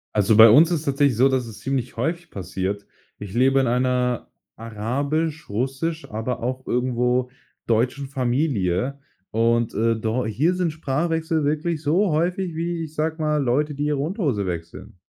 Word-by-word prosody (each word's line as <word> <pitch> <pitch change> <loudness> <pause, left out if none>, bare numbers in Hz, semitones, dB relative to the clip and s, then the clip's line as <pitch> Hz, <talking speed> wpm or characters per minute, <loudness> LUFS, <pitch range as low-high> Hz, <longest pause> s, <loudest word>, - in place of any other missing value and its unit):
Also, 105 +1 +3
bei 115 +1 +11
uns 155 +9 +7
ist 165 -4 0
es - - -11
tatsächlich 140 -3 +2
so, 130 +2 +5
dass 130 -3 0
es 110 -2 -10
ziemlich 130 0 -3
häufig 170 +1 -2
passiert. 95 +1 -4 0.3
Ich 100 -1 -8
lebe 135 +3 +3
in 135 - +2
einer 125 0 0 0.3
arabisch, 140 +9 -3
russisch, 135 +9 -2
aber 115 +2 -4
auch 130 +1 -3
irgendwo 125 0 0 0.3
deutschen 125 +5 0
Familie. 130 - 0 0.3
Und, 115 +1 +1
äh, 115 +2 +1
dor 110 +2 -1
hier 150 - +1
sind 180 -2 0
Sprachwechsel 160 +2 -1
wirklich 155 +2 -1
so 170 +6 +2
häufig 175 +3 0
wie, 165 +1 -2
ich 155 -1 -8
sage 160 +1 -1
mal, 150 -1 +1
Leute, 145 +4 +1
die 145 +1 -2
ihre 150 -1 0
Unterhose 145 - -1
wechseln. 85 0 -7
135 Hz, 165 wpm, -23 LUFS, 115-155 Hz, 0.3 s, bei